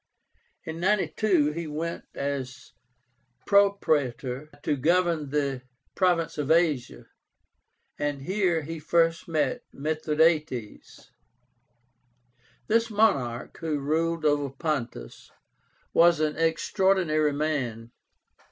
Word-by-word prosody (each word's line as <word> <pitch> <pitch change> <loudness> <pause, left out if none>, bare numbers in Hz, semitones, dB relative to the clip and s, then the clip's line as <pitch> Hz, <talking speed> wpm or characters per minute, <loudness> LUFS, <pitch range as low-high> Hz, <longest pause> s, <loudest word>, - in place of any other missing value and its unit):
In 160 -2 -6
92 190 -4 +2
he 165 +1 -5
went 160 +3 -4
as 135 -3 -4 0.7
Propraetor 150 - +1
to 150 - +1
govern 165 0 +1
the 140 -3 -1 0.3
province 175 -5 +1
of 145 -1 -2
Asia, 155 - +1 0.9
and 145 -2 -2
here 180 -2 0
he 165 +2 -6
first 165 +1 +1
met 150 -5 0
MITHRADÁTES. 155 -5 -1 1.6
This 230 +1 +2
monarch, 140 - 0
who 160 -2 -2
ruled 160 +4 -1
over 145 -2 +2
Pontus, 135 - -4 0.6
was 170 -1 +5
an 155 -1 0
extraordinary 165 -2 +1
man. 130 -7 -2
155 Hz, 90 wpm, -26 LUFS, 140-170 Hz, 1.6 s, was